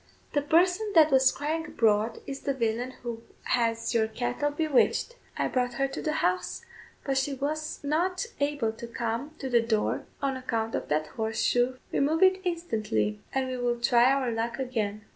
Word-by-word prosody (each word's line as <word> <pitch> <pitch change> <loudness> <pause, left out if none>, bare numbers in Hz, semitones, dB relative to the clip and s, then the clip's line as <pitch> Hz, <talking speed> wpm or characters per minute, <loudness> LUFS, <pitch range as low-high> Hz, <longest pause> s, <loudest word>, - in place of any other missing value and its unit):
The 290 - +2
person 360 +8 +2
that 315 -2 +7
was 265 -1 +5
crying 315 +3 -2
abroad 220 0 +1
is 275 0 -5
the 275 - -2
villain 240 +1 -1
who 235 -2 -5 0.2
has 230 -2 0
your 220 -2 +3
cattle 245 +5 -1
bewitched; 305 - +1 0.2
I - - +1
brought 250 -1 0
her 275 +2 +1
to - - -5
the 305 - -1
house, 180 0 -1 0.4
but 270 -1 +1
she 275 +1 -1
was 305 +3 -3
not 355 +8 0
able 285 -6 0
to 230 +1 -9
come 235 +5 -3
to 270 - -5
the 240 -2 +4
door 225 -2 0
on 275 -1 -1
account 225 -3 -2
of - - -2
that 155 +1 +1
horseshoe. 225 +7 0 0.2
Remove 310 +6 +2
it 375 0 +5
instantly, 215 - -1
and 265 -1 0
we 255 0 -3
will 240 -1 0
try 240 +1 +5
our 270 -3 +1
luck 230 +1 -2
again." 215 -5 -3
255 Hz, 180 wpm, -28 LUFS, 230-290 Hz, 0.4 s, that